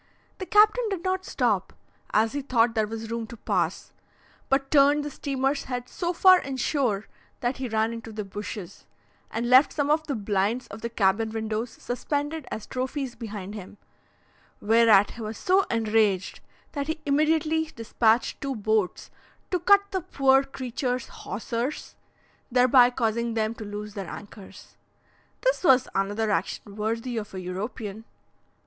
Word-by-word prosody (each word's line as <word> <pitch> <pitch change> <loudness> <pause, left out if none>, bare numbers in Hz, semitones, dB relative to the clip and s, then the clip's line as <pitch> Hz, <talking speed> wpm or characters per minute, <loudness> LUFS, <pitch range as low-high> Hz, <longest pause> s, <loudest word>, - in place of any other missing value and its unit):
The 375 - -5
captain 430 +3 +4
did 380 -4 -3
not 375 0 -1
stop, - - 0 0.4
as 220 +1 +2
he 285 - -2
thought 240 -4 +2
there 220 -2 +1
was 225 +1 -6
room 230 -1 -3
to 235 - -10
pass, - - -2 0.6
but 270 0 +1
turned 290 0 +5
the 295 - -4
steamer's 275 0 -1
head 250 -1 -4
so 345 -1 -2
far 370 +1 +6
in 270 -4 -5
shore, 245 -7 0 0.4
that 245 +2 -1
he 260 -2 -4
ran 220 +1 +1
into 230 -1 -8
the 210 -1 -5
bushes, 200 -2 -7 0.4
and 235 +2 -2
left 255 +4 +6
some 290 -1 0
of 315 +1 +1
the 280 - -1
blinds 205 +3 0
of 200 - -9
the 235 - -3
cabin 220 0 +1
windows 220 +1 -3
suspended 290 +3 -3
as 215 - -5
trophies 260 0 -3
behind 210 -4 -7
him, 205 -1 -9 0.8
whereat 220 -2 +5
he 235 - -10
was 215 0 -5
so 375 +1 +3
enraged, 215 -4 +1 0.3
that 285 -1 -3
he 315 0 -2
immediately 310 +2 +2
dispatched 230 -3 0
two 275 -2 -2
boats 215 -3 -1 0.4
to 365 - +1
cut 400 +4 +6
the 380 -1 -1
poor 270 -3 +3
creatures' 255 -2 -3
hawsers, 235 +6 -4 0.5
thereby 250 0 +6
causing 235 -1 -1
them 220 0 0
to 225 - -9
lose 210 0 -6
their 195 -4 -6
anchors. 205 -1 -11 0.6
This - - +1
was 265 -6 +5
another 205 +3 0
action 200 0 -2
worthy 230 +3 -2
of 210 -3 -5
a - - -4
European! 205 +3 -5
235 Hz, 155 wpm, -26 LUFS, 215-280 Hz, 0.8 s, far